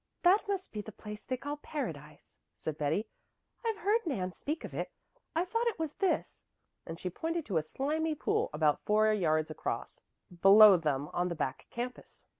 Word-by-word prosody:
"That 380 +5 +5
must 390 -2 -2
be 210 - -3
the 220 - -9
place 210 0 -9
they 255 - -2
call 290 +3 -4
Paradise," 160 - -7 0.2
said 155 - -4
Betty. 155 +8 0 0.6
"I've 450 -2 -1
heard 420 +3 +2
Nan 185 - -1
speak 300 - -4
of - - -7
it. - - -3 0.4
I 335 +2 +2
thought 460 +6 0
it 465 - 0
was 320 -3 -3
this," 385 - 0 0.4
and 165 +1 -6
she 180 - -3
pointed 325 - -2
to 190 -6 -1
a - - +3
slimy 305 - -1
pool - - 0
about 150 -1 +2
four 215 +1 +4
yards 155 -5 +1
across, 155 - -4 0.4
below 205 +1 +10
them 150 -4 0
on 175 +1 +1
the 170 - -3
back 130 -4 -3
campus. 245 +1 -7
215 Hz, 185 wpm, -32 LUFS, -, 0.6 s, below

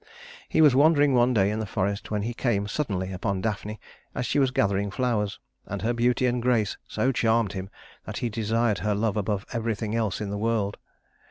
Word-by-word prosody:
He - - +3
was 150 -4 +7
wandering 145 -1 +5
one 125 0 +4
day 100 -4 +3
in 110 - -2
the 110 - -3
forest 100 +1 -2
when 105 -1 -1
he 120 +2 -2
came 110 -5 0
suddenly 95 -8 -2
upon 95 +1 -2
Daphne 105 +1 -3 0.4
as 125 - -2
she 145 - +1
was 135 -2 +3
gathering 100 -4 +1
flowers, 105 -2 -1 0.3
and 100 -1 -5
her 120 +2 +1
beauty 120 +1 +2
and 125 -1 +1
grace 115 -5 +1
so 120 +5 0
charmed 115 -4 +1
him 95 0 -5 0.4
that - - -6
he 120 - -1
desired 110 0 0
her 105 -1 0
love 105 0 0
above 105 -1 -1
everything 110 -2 -2
else 110 -5 0
in 105 -2 -4
the 100 - -3
world. 110 -2 0
110 Hz, 200 wpm, -26 LUFS, 100-120 Hz, 0.4 s, was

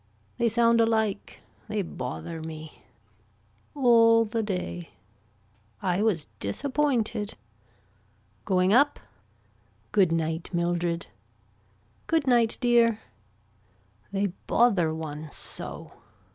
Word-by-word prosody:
They 235 -1 +3
sound 230 +1 +4
alike. 220 -3 0 0.3
They 210 -2 -1
bother 160 +2 -6
me. 155 -1 -9 0.9
All 230 -4 +5
the 225 +1 -2
day. 180 -4 -4 0.9
I 180 - 0
was 195 -9 +1
disappointed. 230 - -1 1.1
Going 185 0 +2
up. 285 +4 +4 0.9
Good 195 -5 +3
night 165 0 -1
Mildred. 170 -1 -1 1.0
Good 325 -3 +1
night 240 -3 +3
dear. 235 -3 +4 1.1
They 200 -2 -1
bother 200 -9 +3
one 155 -1 -6
so. - - -7
205 Hz, 90 wpm, -27 LUFS, 170-230 Hz, 1.1 s, All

